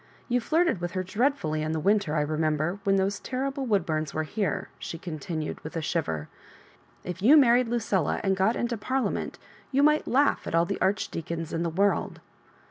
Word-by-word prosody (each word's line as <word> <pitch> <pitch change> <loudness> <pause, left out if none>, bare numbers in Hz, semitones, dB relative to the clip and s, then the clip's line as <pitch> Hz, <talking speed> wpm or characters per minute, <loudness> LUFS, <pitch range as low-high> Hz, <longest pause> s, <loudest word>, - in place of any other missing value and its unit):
You 245 0 +2
flirted 320 - +1
with 175 0 -3
her 185 -1 -1
dreadfully 190 - 0
in 155 +1 -1
the 160 - -1
winter, 200 -2 +2
I 150 - +2
remember, 155 +4 0
when 195 -1 +3
those 195 +1 0
terrible 270 +1 -3
Woodbums 160 -8 0
were 155 - 0
here," 195 +1 -2
she 165 - -6
continued, 155 -2 -5
with 155 - -8
a - - -1
shiver. 80 - -2 0.8
"If 180 0 -6
you 270 +10 +7
married 250 -3 +5
Lucilla 220 -7 0
and 195 -1 +2
got 190 +5 +2
into 240 -1 -1
Parliament, 260 +5 -2 0.3
you 275 +1 +3
might 300 +1 +3
laugh 280 +3 +2
at - - -1
all 165 0 +4
the 195 +3 -4
arch 195 +2 +1
deacons 165 -1 -5
in 165 - -1
the 170 - 0
world. 195 +5 0
190 Hz, 190 wpm, -27 LUFS, 160-235 Hz, 0.8 s, you